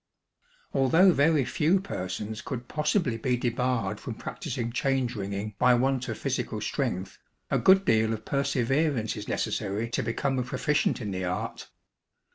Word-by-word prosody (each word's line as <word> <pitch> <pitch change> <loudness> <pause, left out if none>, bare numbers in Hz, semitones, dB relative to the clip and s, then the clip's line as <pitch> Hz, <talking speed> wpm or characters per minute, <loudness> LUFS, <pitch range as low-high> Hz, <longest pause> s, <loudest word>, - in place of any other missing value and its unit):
Although 165 +9 +5
very 150 -2 +3
few 160 +9 +2
persons 105 - -5
could 125 -2 -6
possibly 150 - 0
be 125 -1 +1
debarred 120 -4 -1
from - - -6
practising 120 0 -4
change 130 -1 0
ringing 100 +1 -4
by 125 -1 +5
want 130 +1 0
of - - -3
physical - - -2
strength, 95 +1 -3 0.3
a - - +3
good 190 +1 +5
deal 110 0 +3
of 110 0 -4
perseverance 140 -2 0
is 105 -1 -7
necessary 110 +3 -2
to - - 0
become 130 +4 -1
a - - 0
proficient 150 +1 0
in 105 -3 -3
the 95 0 -2
art. 90 +1 -4
125 Hz, 150 wpm, -27 LUFS, 110-140 Hz, 0.3 s, Although